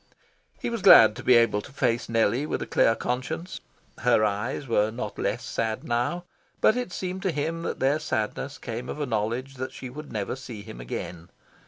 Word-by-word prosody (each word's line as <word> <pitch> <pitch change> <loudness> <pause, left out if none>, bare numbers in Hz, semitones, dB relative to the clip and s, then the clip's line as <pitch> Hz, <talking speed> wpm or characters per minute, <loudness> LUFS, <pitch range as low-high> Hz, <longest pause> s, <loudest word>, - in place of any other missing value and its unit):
He - - -3
was 230 -3 -3
glad 110 -9 +9
to - - -8
be 125 - +6
able 115 -3 +4
to - - -13
face 120 -4 0
Nellie 115 +5 +2
with - - -2
a - - -5
clear 115 - +3
conscience. 160 +10 -3 0.4
Her 110 - +4
eyes 110 +7 -2
were 110 -2 +2
not 115 +3 -6
less - - -1
sad 110 -1 -2
now, 120 +9 -1 0.4
but 220 - +5
it 250 -7 -3
seemed 185 +1 -4
to 190 -2 0
him 160 +2 -2
that - - -4
their 140 +3 +2
sadness 135 0 -3
came 120 +1 -6
of - - -5
a 145 - 0
knowledge 120 +3 -2
that 130 +1 -4
she 130 -2 -8
would 150 +3 -9
never 105 0 -2
see 120 -5 -8
him 105 - -9
again. 85 +7 -6
125 Hz, 200 wpm, -26 LUFS, 110-150 Hz, 0.4 s, glad